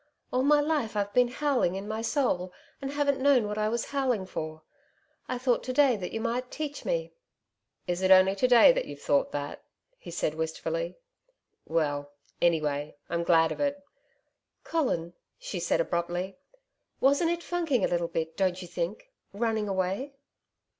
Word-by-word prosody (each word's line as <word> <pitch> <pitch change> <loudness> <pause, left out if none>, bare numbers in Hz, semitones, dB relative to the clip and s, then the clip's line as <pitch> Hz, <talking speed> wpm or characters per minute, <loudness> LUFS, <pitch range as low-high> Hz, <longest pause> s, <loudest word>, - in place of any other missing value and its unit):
All 255 - +3
my 295 +2 +5
life 290 -7 0
I've 205 0 -1
been 250 0 +5
howling 255 -7 0
in 195 +2 -5
my 220 +1 -3
soul 225 -8 0 0.3
and 270 - -3
haven't 285 -1 +1
known 265 -5 +4
what 210 +1 -3
I 215 0 +1
was 235 +1 -1
howling 255 -8 0
for. 155 -3 -6 0.7
I 255 - -1
thought 245 -1 +1
to 255 - -2
day 270 -2 +5
that 180 -4 -5
you 225 - -3
might 240 +2 -2
teach 300 -2 -5
me.' - - -2 0.7
'Is 175 +1 -2
it 190 - +2
only 190 0 +7
to 255 - +3
day 245 - +8
that - - -1
you - - -7
have - - -18
thought 280 - +2
that?' 145 0 -5 0.4
he - - -10
said 150 - -1
wistfully. 160 - -3 0.7
'Well, 145 -3 -1 0.3
anyway, 150 -4 +1 0.2
I'm 170 0 0
glad 165 -1 +4
of - - -5
it.' 285 0 0 0.8
'Colin,' 175 - -1 0.2
she 185 - -5
said 170 - +1
abruptly, 175 +3 -1 0.6
'wasn't 285 +5 +3
it 345 0 -2
funking 325 - 0
a - - +2
little 170 -1 0
bit, 160 -1 -3
don't 185 -1 +1
you 180 - -7
think 180 - -4 0.2
running 220 -1 -1
away?' 195 +9 -2
215 Hz, 175 wpm, -28 LUFS, 175-275 Hz, 0.8 s, day